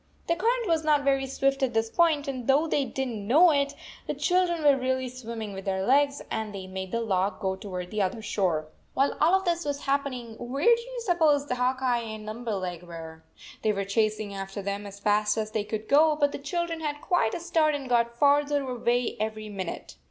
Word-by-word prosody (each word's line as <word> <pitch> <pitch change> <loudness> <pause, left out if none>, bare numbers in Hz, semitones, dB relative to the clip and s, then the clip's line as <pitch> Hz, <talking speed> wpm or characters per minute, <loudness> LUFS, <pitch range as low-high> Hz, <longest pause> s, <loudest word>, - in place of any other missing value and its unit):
The 335 - +1
current 465 +5 0
was 325 -1 +1
not 300 -2 +3
very 270 -1 +2
swift 275 +1 0
at 250 -3 0
this 225 0 +2
point, 315 -4 +2
and 255 -3 -4
though 280 +4 +4
they 290 -3 +1
did 265 0 -3
n 245 - -4
t 215 - -5
know 295 - +5
it, 280 -1 0 0.3
the - - -2
children 355 -3 +1
were 285 -2 +6
really 260 0 -1
swimming 230 -4 -6
with 195 0 -7
their 190 -1 -1
legs, 280 +3 +3
and 220 -2 -3
they 190 -1 -6
made 190 0 -6
the 230 - -1
log 195 -3 0
go 190 -1 -1
toward 180 -2 -6
the 215 - -1
other 200 +4 -1
shore. 170 -8 0 0.3
While 275 +1 +2
all 335 +5 +5
of 385 0 0
this 345 -1 0
was 285 -1 -3
happening, 260 -5 -2
where 260 +6 -3
do 470 - -6
you - - -7
suppose 310 -6 +3
Hawk 250 +1 0
Eye 245 -2 +2
and 220 -2 -7
Limberleg 210 -6 -4
were? 165 -2 -10 0.4
They 215 - +2
were 200 -1 -2
chasing 215 0 0
after 195 +1 -6
them 200 +1 -3
as 200 0 -10
fast 210 +1 +2
as 215 0 -2
they 215 -1 -1
could 215 0 -5
go, 305 +2 +5
but 290 -1 +2
the - - -5
children 335 +3 -2
had 300 -2 -2
86 295 - -17
quite 350 -12 +2
a - - -3
start 325 -3 +2
and 275 -2 -5
got 235 -1 +1
farther 285 0 +3
away 245 -1 0
every 215 0 -3
min 195 -3 -4
ute. - - -7
250 Hz, 225 wpm, -27 LUFS, 210-290 Hz, 0.4 s, were